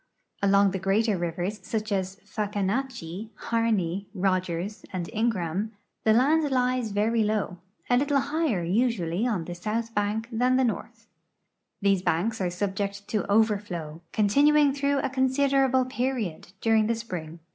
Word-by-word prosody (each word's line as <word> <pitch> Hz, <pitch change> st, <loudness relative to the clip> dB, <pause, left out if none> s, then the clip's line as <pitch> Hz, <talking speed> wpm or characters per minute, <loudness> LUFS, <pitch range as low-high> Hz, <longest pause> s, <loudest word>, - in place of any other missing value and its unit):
Along 200 Hz, 0 st, +4 dB
the 190 Hz, -, -3 dB
greater 205 Hz, +3 st, +2 dB
rivers, 175 Hz, +4 st, -3 dB
such 215 Hz, +2 st, -3 dB
as 190 Hz, -1 st, -1 dB
the 210 Hz, -, -31 dB
Fahkahnatchee, 210 Hz, -1 st, -3 dB
Harqey, 205 Hz, -6 st, 0 dB
Rogers, 185 Hz, +1 st, -1 dB
and 180 Hz, -3 st, -3 dB
Ingraham, 210 Hz, -2 st, -1 dB, 0.3 s
the 220 Hz, -, +5 dB
land 295 Hz, +6 st, +3 dB
lies 250 Hz, -2 st, +1 dB
very 220 Hz, +3 st, +2 dB
low, 210 Hz, -4 st, -1 dB, 0.3 s
a 245 Hz, -, +3 dB
little 285 Hz, +1 st, +2 dB
higher 285 Hz, -, 0 dB
usually 195 Hz, 0 st, +1 dB
on 195 Hz, -9 st, -1 dB
the 175 Hz, -, -5 dB
south 220 Hz, +6 st, -3 dB
hank 210 Hz, +2 st, 0 dB
than 250 Hz, +3 st, +2 dB
the 260 Hz, -, +3 dB
north. 230 Hz, 0 st, -3 dB, 0.8 s
These 195 Hz, -2 st, +3 dB
banks 195 Hz, +6 st, 0 dB
are 180 Hz, -, +1 dB
subject 200 Hz, +2 st, -3 dB
to 215 Hz, -, +1 dB
overfiow, 200 Hz, -7 st, 0 dB
continuing 285 Hz, +7 st, +4 dB
through 280 Hz, 0 st, +1 dB
a -, -, -1 dB
considerable 265 Hz, 0 st, +2 dB
period, 250 Hz, -8 st, -2 dB
during 220 Hz, -1 st, +3 dB
the 230 Hz, -, +1 dB
spring. 175 Hz, -8 st, -6 dB
215 Hz, 145 wpm, -27 LUFS, 190-245 Hz, 0.8 s, the